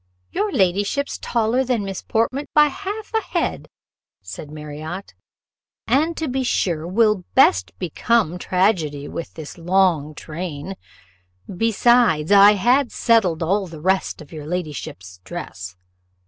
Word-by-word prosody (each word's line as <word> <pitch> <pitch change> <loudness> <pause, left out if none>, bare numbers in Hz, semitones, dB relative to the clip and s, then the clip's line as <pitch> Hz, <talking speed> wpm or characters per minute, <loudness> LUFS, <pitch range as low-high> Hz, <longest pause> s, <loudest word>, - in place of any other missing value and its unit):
"Your 210 - -1
ladyship's 205 +9 0
taller 235 +2 +1
than 240 -5 -1
Miss 195 -1 -5
Portman 255 +6 -1
by 300 -1 +6
half 410 +9 -6
ahead," 445 - -1 0.5
said 150 - -9
Marriott, 155 +5 -7 0.7
"and 315 +4 +1
to 320 - -2
be 265 0 -1
sure 170 -10 0
will 210 0 +2
best 95 0 +4
become 180 +1 0
tragedy 175 -7 0
with 165 - -7
this 160 +1 -9
long 170 -4 +1
train; 160 +2 -6 0.8
besides, 225 -5 +3
I 200 +1 +8
had 245 +6 +2
settled 190 -9 +2
all 195 +3 0
the 165 -2 -10
rest 185 -1 0
of 145 - -20
your 150 -2 -8
ladyship's 150 - -5
dress. 90 0 -7
190 Hz, 125 wpm, -21 LUFS, 155-230 Hz, 0.8 s, I